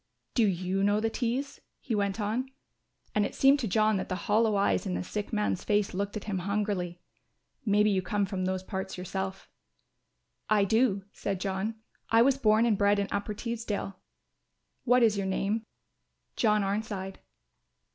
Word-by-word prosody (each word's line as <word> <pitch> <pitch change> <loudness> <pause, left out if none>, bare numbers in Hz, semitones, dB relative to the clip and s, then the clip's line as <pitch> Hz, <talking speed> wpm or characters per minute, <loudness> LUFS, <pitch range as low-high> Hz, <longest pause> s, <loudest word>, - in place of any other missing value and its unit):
"Do 230 -4 +4
you 185 +1 0
know 205 +1 +3
the 225 +1 0
Tees?" 255 +4 -2 0.2
he 240 - -4
went 200 0 0
on; 225 +5 -1 0.6
and 210 - +2
it - - -3
seemed 275 +1 +5
to 240 - -1
John 215 +1 +3
that - - -4
the 185 - -1
hollow 215 0 +3
eyes 200 0 +1
in 180 - -1
the - - -2
sick 205 +3 -4
man's 210 -4 0
face 205 -2 +1
looked 200 +3 -2
at 210 - -6
him 195 -3 -2
hungrily. 195 -2 -2 0.7
"Maybe 210 +1 +4
you 190 -1 +2
come 205 +1 0
from 185 -1 -3
those 185 0 -1
parts 190 0 -5
yourself." 190 +1 -4 1.0
"I 210 -2 +4
do," 215 -2 +2
said 195 -2 -3
John; 195 +3 -2 0.3
"I 225 +1 +6
was 275 +1 +3
born 220 -1 +4
and 220 -4 +2
bred 205 0 +4
in 200 0 -1
Upper 205 +1 -2
Teesdale." 220 -4 -4 0.9
"What 250 0 +5
is 215 -3 +4
your 195 - -1
name?" 210 +4 -1 0.7
"John 210 -2 +3
Arnside." 195 -1 -3
205 Hz, 170 wpm, -29 LUFS, 195-220 Hz, 1.0 s, I